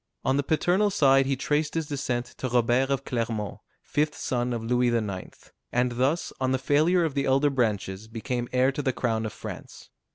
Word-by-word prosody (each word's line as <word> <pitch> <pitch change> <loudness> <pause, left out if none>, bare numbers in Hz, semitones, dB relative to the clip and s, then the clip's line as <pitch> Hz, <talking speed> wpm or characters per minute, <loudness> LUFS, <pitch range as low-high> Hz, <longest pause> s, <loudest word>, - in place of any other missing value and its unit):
On 130 - +2
the 140 - +2
paternal 175 +8 +2
side 135 -7 +4
he 135 - +1
traced 150 +3 -1
his 165 -1 0
descent 130 -4 -2
to 130 - -2
Robert 120 +2 +2
of 135 0 -1
Clermont, 115 -4 -3 0.2
fifth 150 0 -1
son 125 -1 -1
of 115 -2 -3
Louis 125 +2 +2
IX., 105 -6 -1 0.4
and 125 0 +1
thus, 130 +8 0
on 130 0 +1
the 130 - +2
failure 155 +7 +3
of 155 - -2
the 140 0 0
elder 135 +2 +3
branches, 105 -5 -1
became 120 +2 -3
heir 130 +1 +3
to 140 - -3
the 130 -2 0
crown 110 -3 -1
of - - -6
France. - - -9
130 Hz, 195 wpm, -26 LUFS, 120-145 Hz, 0.4 s, side